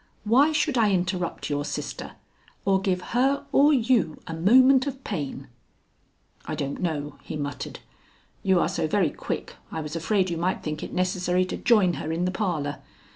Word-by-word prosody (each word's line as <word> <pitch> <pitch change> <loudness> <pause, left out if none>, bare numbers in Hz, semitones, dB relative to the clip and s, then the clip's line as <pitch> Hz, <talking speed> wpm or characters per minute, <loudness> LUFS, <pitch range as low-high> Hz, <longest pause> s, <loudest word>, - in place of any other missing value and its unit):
Why 260 +8 +4
should 300 -4 +1
I 215 -2 +4
interrupt 180 -1 -1
your 145 0 0
sister - - -5 0.5
or 195 -1 +3
give 185 -2 0
her 275 +3 +2
or 290 +2 +5
you 240 - +2
a 165 - -6
moment 255 - +5
of 270 -1 -5
pain?" 140 -7 -4 1.0
"I - - -4
don't 140 -2 -4
know," 150 -4 -3
he - - -7
muttered. 145 -2 -5 0.6
"You 190 -2 +3
are - - +2
so - - -1
very 170 -2 +2
quick - - -5
I 160 - -3
was 150 0 -5
afraid 185 +2 +1
you 170 - -2
might 180 +3 -1
think 155 0 -4
it - - -6
necessary 180 0 +1
to 185 - -4
join 205 -7 +4
her 155 - -3
in 170 +2 0
the 185 - 0
parlor. 165 -8 -2
185 Hz, 180 wpm, -25 LUFS, 160-225 Hz, 1.0 s, or